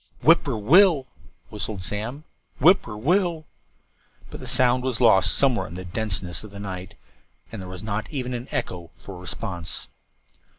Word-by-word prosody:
"Whip -, -, +6 dB
poor -, -, -2 dB
will 135 Hz, -, +7 dB
l 170 Hz, -, 0 dB
l," 130 Hz, -, -24 dB, 0.4 s
whistled 105 Hz, -2 st, -5 dB
Slim. 115 Hz, +10 st, -4 dB, 0.4 s
"Whip 180 Hz, +8 st, +6 dB
poor 105 Hz, -2 st, -8 dB
will 170 Hz, -, +3 dB
l 175 Hz, -2 st, -1 dB
l." 155 Hz, -1 st, -14 dB, 0.9 s
But -, -, -8 dB
the -, -, -9 dB
sound 125 Hz, 0 st, +3 dB
was 130 Hz, -3 st, -1 dB
lost 110 Hz, -6 st, +5 dB
somewhere 135 Hz, -4 st, +3 dB
in 85 Hz, -, -9 dB
the 95 Hz, 0 st, -7 dB
denseness 95 Hz, -3 st, -3 dB
of 110 Hz, -, -10 dB
the 100 Hz, 0 st, -10 dB
night, 95 Hz, -2 st, -7 dB, 0.6 s
and 110 Hz, -4 st, -6 dB
there 90 Hz, -, -8 dB
was 90 Hz, +1 st, -8 dB
not 105 Hz, 0 st, -3 dB
even 130 Hz, -4 st, -3 dB
an 120 Hz, +1 st, -5 dB
echo 85 Hz, -2 st, -4 dB
for 95 Hz, -3 st, -10 dB
response. 90 Hz, -2 st, -5 dB
110 Hz, 185 wpm, -24 LUFS, 95-130 Hz, 0.9 s, will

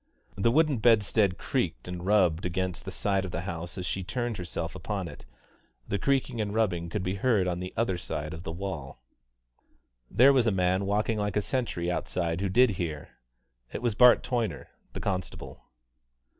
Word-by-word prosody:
The 100 Hz, +4 st, +2 dB
wooden 150 Hz, 0 st, +3 dB
bedstead 105 Hz, -4 st, +3 dB
creaked, 60 Hz, -, -2 dB
and 90 Hz, -1 st, -5 dB
rubbed 95 Hz, -4 st, +3 dB
against 90 Hz, 0 st, -2 dB
the -, -, -5 dB
side 100 Hz, -2 st, 0 dB
of 95 Hz, -, -4 dB
the -, -, -3 dB
house 85 Hz, 0 st, -6 dB
as 90 Hz, -, -4 dB
she 95 Hz, -, -2 dB
turned 120 Hz, +3 st, -3 dB
herself 85 Hz, -1 st, -4 dB
upon 95 Hz, +1 st, -4 dB
it. 75 Hz, -, -11 dB, 0.6 s
The 100 Hz, -, -1 dB
creaking 130 Hz, -1 st, 0 dB
and 105 Hz, 0 st, -3 dB
rubbing 90 Hz, -7 st, 0 dB
could 95 Hz, +2 st, -2 dB
be 90 Hz, -, -1 dB
heard 110 Hz, -8 st, +3 dB
on 90 Hz, -1 st, -1 dB
the 90 Hz, 0 st, -5 dB
other 95 Hz, -6 st, 0 dB
side 75 Hz, -2 st, -4 dB
of 80 Hz, -, -7 dB
the 80 Hz, -, -5 dB
wall. 80 Hz, -9 st, -6 dB, 1.1 s
There 135 Hz, +3 st, +6 dB
was 125 Hz, -4 st, +3 dB
a -, -, +4 dB
man 95 Hz, +1 st, +1 dB
walking 105 Hz, +2 st, +1 dB
like 105 Hz, 0 st, -1 dB
a -, -, +3 dB
sentry 95 Hz, -10 st, -1 dB
outside 85 Hz, +1 st, -2 dB
who 100 Hz, -, 0 dB
did 125 Hz, +4 st, +5 dB
hear. 75 Hz, -4 st, -4 dB, 0.6 s
It -, -, -5 dB
was 120 Hz, -3 st, +1 dB
Bart 125 Hz, +4 st, +6 dB
Toyner, 120 Hz, -3 st, -2 dB, 0.2 s
the -, -, -5 dB
constable. 95 Hz, -3 st, -4 dB
95 Hz, 185 wpm, -28 LUFS, 85-110 Hz, 1.1 s, There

